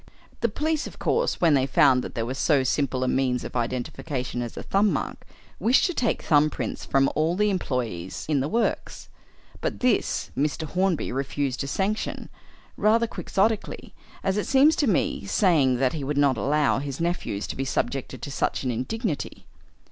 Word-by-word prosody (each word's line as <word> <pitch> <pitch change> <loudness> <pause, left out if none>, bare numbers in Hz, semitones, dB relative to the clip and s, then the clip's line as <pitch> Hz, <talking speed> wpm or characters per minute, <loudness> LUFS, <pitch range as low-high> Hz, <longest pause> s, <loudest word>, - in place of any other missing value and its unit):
The 235 - +1
police, 305 +7 -1
of - - -12
course, 475 +2 0
when 165 -3 +4
they 135 -1 +3
found 130 -1 +4
that - - -7
there 115 - -1
was 130 +3 -4
so 145 -5 +3
simple 130 -1 0
a - - 0
means 125 -1 +1
of - - -8
identification 125 +1 -3
as 120 -1 -6
a - - -5
thumb 200 +1 +2
mark, - - -4 0.3
wished 245 +4 +4
to 355 - 0
take 240 -7 0
thumb 150 0 +4
prints - - -5
of 135 0 +4
all 160 +3 0
the 210 +1 +2
employees 120 - -3
in 150 -3 +2
the 135 - 0
works; 230 +7 -2 0.5
but - - -2
this 250 -4 +1
Mr. 150 +3 -1
Hornby 180 +1 0
refused 135 0 -2
to 140 - -2
sanction 200 +8 -2 0.5
rather 225 +2 +3
quixotically, 220 -1 -1 0.3
as 195 +1 0
it 210 - -1
seems 280 +4 +5
to 290 - +2
me 190 - +1
saying 145 - +3
that 130 +1 +1
he 155 -4 -4
would 145 +1 -2
not 140 -2 +4
allow 140 +6 +1
his 140 -1 -5
nephews 170 - -2
to - - -6
be 135 - -2
subjected 135 0 -3
to 140 - -5
such - - -1
an 130 - 0
indignity. 155 - -3
145 Hz, 185 wpm, -25 LUFS, 130-200 Hz, 0.5 s, seems